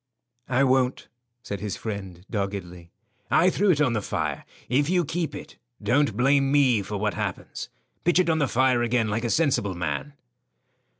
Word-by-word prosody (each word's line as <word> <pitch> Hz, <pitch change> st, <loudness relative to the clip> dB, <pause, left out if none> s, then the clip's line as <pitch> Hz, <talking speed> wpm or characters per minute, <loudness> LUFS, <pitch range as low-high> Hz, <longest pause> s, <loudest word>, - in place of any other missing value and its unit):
"I 130 Hz, +2 st, +3 dB
won't," 130 Hz, -1 st, +1 dB, 0.3 s
said 100 Hz, -4 st, -5 dB
his 105 Hz, 0 st, -4 dB
friend, 95 Hz, -5 st, -6 dB
doggedly. 95 Hz, -5 st, -4 dB, 0.4 s
"I 185 Hz, +2 st, +4 dB
threw 205 Hz, +2 st, +1 dB
it 160 Hz, -5 st, +4 dB
on 135 Hz, -5 st, +3 dB
the 110 Hz, -, 0 dB
fire. -, -, -3 dB, 0.2 s
If 140 Hz, +5 st, +1 dB
you 180 Hz, -2 st, +2 dB
keep 165 Hz, +2 st, -3 dB
it, -, -, -10 dB, 0.2 s
don't 140 Hz, -4 st, +1 dB
blame 135 Hz, +2 st, +3 dB
me 130 Hz, -7 st, +4 dB
for 100 Hz, +2 st, -5 dB
what 105 Hz, 0 st, -1 dB
happens. -, -, -5 dB, 0.3 s
Pitch 175 Hz, 0 st, +3 dB
it 185 Hz, -, +3 dB
on 160 Hz, -1 st, +2 dB
the 145 Hz, -, +2 dB
fire 130 Hz, 0 st, +2 dB
again 120 Hz, -2 st, +1 dB
like 110 Hz, +3 st, -1 dB
a -, -, 0 dB
sensible 130 Hz, -, +1 dB
man." 90 Hz, +11 st, -3 dB
125 Hz, 175 wpm, -25 LUFS, 105-145 Hz, 0.4 s, I